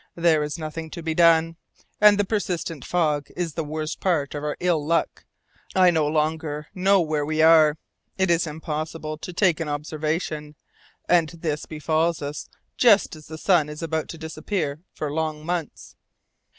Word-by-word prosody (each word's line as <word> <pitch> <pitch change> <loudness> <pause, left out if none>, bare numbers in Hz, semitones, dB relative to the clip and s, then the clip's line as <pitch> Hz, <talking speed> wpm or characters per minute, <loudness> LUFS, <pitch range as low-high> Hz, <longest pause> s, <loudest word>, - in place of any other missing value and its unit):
There 165 -2 +3
is 150 +1 -3
nothing 160 0 -6
to 170 +1 -8
be 160 0 -1
done, 165 0 +4 0.4
and 210 -1 +7
the 205 - +1
persistent 175 - -2
fog 150 -5 0
is 170 -3 -3
the 165 - -2
worst 155 +1 -4
part 160 -7 0
of 145 0 -5
our 150 0 -3
ill 175 -4 +1
luck. 165 +3 -1 0.5
I 185 -1 +6
no 160 -3 +1
longer 150 0 -1
know 195 +1 +3
where 155 -2 -1
we 155 +1 +1
are. 160 -2 +6 0.4
It 190 -2 +2
is 170 0 +2
impossible 155 0 -5
to 180 - -7
take 180 -2 +2
an 160 -2 -3
observation, 150 0 -3 0.5
and 170 -3 +4
this 160 -3 -4
befalls 160 +2 0
us 145 +1 -6 0.3
just 210 -8 +4
as 155 -1 -14
the 160 - -8
sun 160 -3 +2
is 150 +2 -7
about 160 -1 -2
to 165 - -7
disappear 160 -1 -3
for 150 -2 -4
long 155 -1 -2
months." 170 -3 -4
160 Hz, 170 wpm, -24 LUFS, 150-170 Hz, 0.5 s, and